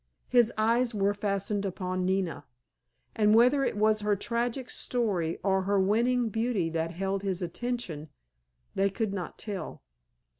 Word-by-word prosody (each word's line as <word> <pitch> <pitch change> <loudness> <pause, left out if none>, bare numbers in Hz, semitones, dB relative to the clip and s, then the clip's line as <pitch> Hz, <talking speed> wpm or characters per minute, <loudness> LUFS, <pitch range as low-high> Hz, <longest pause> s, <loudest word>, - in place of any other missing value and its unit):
His 240 -2 +4
eyes 230 +2 +2
were 200 0 +2
fastened 200 0 -1
upon 185 -1 -2
Nina, 190 -3 -1 0.7
and 210 0 +4
whether 250 +4 +5
it 235 - -1
was 215 +1 +3
her 210 0 +2
tragic 240 +4 -2
story 195 -10 -1
or 190 -1 +2
her 200 +1 +1
winning 235 +5 +2
beauty 220 -6 -1
that 165 0 -1
held 195 +3 -2
his 190 -3 -2
attention 180 -5 -4 0.6
they 195 +1 +2
could 205 0 -2
not 185 -3 -5
tell. 205 -3 -5
205 Hz, 145 wpm, -29 LUFS, 190-235 Hz, 0.7 s, whether